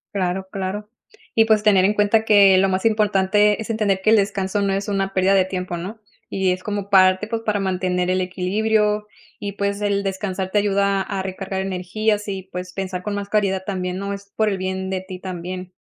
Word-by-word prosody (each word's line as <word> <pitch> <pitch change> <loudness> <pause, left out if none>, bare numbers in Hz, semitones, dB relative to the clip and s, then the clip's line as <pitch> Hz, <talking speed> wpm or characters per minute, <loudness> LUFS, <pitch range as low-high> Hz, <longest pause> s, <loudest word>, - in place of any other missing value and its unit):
Claro, 190 0 -1
claro. 200 +2 -4 0.5
Y 225 - +6
pues, 220 -1 +3
tener 200 -3 +4
en 200 +2 +3
cuenta 210 +1 +3
que 200 -3 +6
lo 195 +1 +3
más 190 +2 -1
importante 210 -1 +3
es 220 - -7
entender 210 -4 +1
que 215 +3 +3
el - - +7
descanso 200 -1 0
no 200 - +1
es 195 +2 -2
una 195 -1 -1
pérdida 190 +1 +3
de 190 -1 +5
tiempo, 185 -1 -4
¿no? 195 +6 -6 0.3
Y 190 -1 +1
es 185 0 -7
como 205 -1 -4
parte, 185 0 +4
pues 225 0 -3
para 210 -2 -1
mantener 185 -1 -1
el 185 0 +1
equilibrio. 210 +3 0 0.3
Y 205 -1 -3
pues 200 0 -1
el 200 -1 0
descansar 190 -1 -3
te 210 - +1
ayuda 200 -1 +1
a 195 0 -3
recargar 190 0 -4
energías, 205 +3 -1
y 190 -1 -4
pues, 180 -1 -7
pensar 185 -1 -4
con 210 - -3
más 205 0 -4
claridad 195 -2 0
también, 180 -2 -3
¿no? 200 +1 -3
Es 200 0 -10
por 220 - +2
el 200 -2 0
bien 190 0 -3
de 190 -1 -2
ti 185 -1 -9
también. 185 0 -6
195 Hz, 210 wpm, -21 LUFS, 185-205 Hz, 0.5 s, el